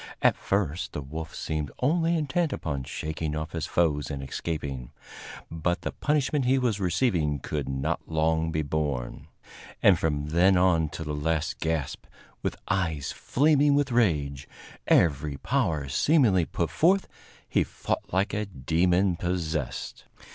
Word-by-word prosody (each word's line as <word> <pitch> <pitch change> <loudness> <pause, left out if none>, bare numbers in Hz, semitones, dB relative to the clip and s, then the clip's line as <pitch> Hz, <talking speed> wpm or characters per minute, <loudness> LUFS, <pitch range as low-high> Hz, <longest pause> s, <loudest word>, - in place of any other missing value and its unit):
At - - +5
first 90 -4 -1
the 75 - -3
wolf 80 +4 -7
seemed 75 -2 -3
only 165 +5 +2
intent 155 +2 0
upon 70 - -3
shaking 80 +1 -4
off 80 +1 -4
his 80 -2 -3
foes 75 -6 +1
and 70 -2 -4
escaping, 70 -3 -4 0.6
but 85 +3 -1
the - - -3
punishment 145 -2 0
he 130 +2 +4
was 120 -6 0
receiving 90 - +1
could 70 0 -4
not 70 +4 -2
long 80 0 +1
be 80 -1 0
borne; 70 -4 -3 0.5
and 95 -4 +5
from 75 -2 -1
then 90 +4 +4
on 85 -4 +3
to 80 - -6
the 75 -1 -4
last 80 +2 -1
gasp, 80 -4 -2 0.3
with - - -2
eyes 80 -7 -1
flaming 145 0 +3
with 140 -2 +1
rage, 75 - +1 0.4
every 75 -3 +3
power 75 +1 0
seemingly 105 - +3
put - - -2
forth, 185 +4 +3 0.4
he - - +2
fought - - -4
like 95 +3 +1
a 105 0 -1
demon 90 +4 +1
possessed. 80 -6 -3
80 Hz, 145 wpm, -27 LUFS, 75-100 Hz, 0.6 s, At